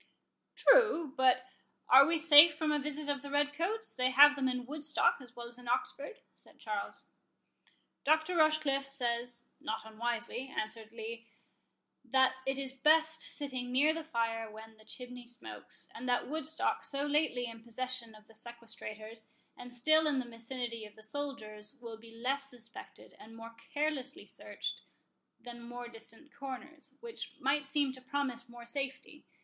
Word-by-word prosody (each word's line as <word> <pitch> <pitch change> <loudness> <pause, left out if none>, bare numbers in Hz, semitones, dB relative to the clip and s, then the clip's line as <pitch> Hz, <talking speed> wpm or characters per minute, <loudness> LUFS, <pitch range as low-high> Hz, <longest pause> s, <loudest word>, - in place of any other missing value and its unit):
"True; 445 - +5
but 255 -2 +4 0.4
are 270 +2 +9
we 335 0 +2
safe 310 -1 +9
from 310 -1 +1
a 300 - +2
visit 295 +1 -4
of 285 -2 -1
the 285 - -8
red 290 +1 +1
coats—they 340 -6 0
have 290 +3 +8
them 265 -2 +1
in 250 -1 -2
Woodstock 295 +2 +1
as 245 -1 -14
well 240 - -7
as 240 +1 -10
in 245 - -13
Oxford?" 280 - -2
said - - -18
Charles. 210 -2 -5 1.0
"Dr. 315 +4 +3
Rochecliffe 310 -3 +3
says, 240 -2 -1
not 220 -7 -4
unwisely," 235 +3 -3
answered 220 -3 -4
Lee, 230 0 -7 0.8
"that 260 0 +4
it 270 0 +1
is 270 -1 -4
best 315 +3 +3
sitting 255 -4 -3
near 290 +5 +4
the 325 0 -4
fire 230 -5 -1
when 220 +1 -11
the 215 - -19
chimney 250 +1 -9
smokes; 245 +1 -5
and 250 +2 -5
that 245 - +1
Woodstock, 315 - -1
so 280 0 -2
lately 290 -4 +1
in 230 -1 -8
possession 235 -1 -3
of 215 0 -17
the 225 - -19
sequestrators, 225 -1 -7 0.3
and 245 0 -10
still 310 +6 +4
in 290 -2 +2
the 255 - -1
vicinity 235 0 -5
of 210 -1 -11
the 220 - -16
soldiers, 215 -3 -5
will 230 -2 -8
be 225 +1 -15
less 265 +4 -1
suspected, 235 -2 -10
and 225 +1 -13
more 230 0 -10 0.2
carelessly 300 +1 -2
searched, - - -5 0.6
than 240 -1 -10
more 245 +1 -7
distant 230 +5 -12
corners, 275 +3 -8
which 465 -1 -6
might 280 +1 +1
seem 280 -1 +1
to 260 - -12
promise 255 -3 -2
more 240 0 -11
safety. 270 +3 -5
255 Hz, 160 wpm, -33 LUFS, 235-290 Hz, 1.0 s, are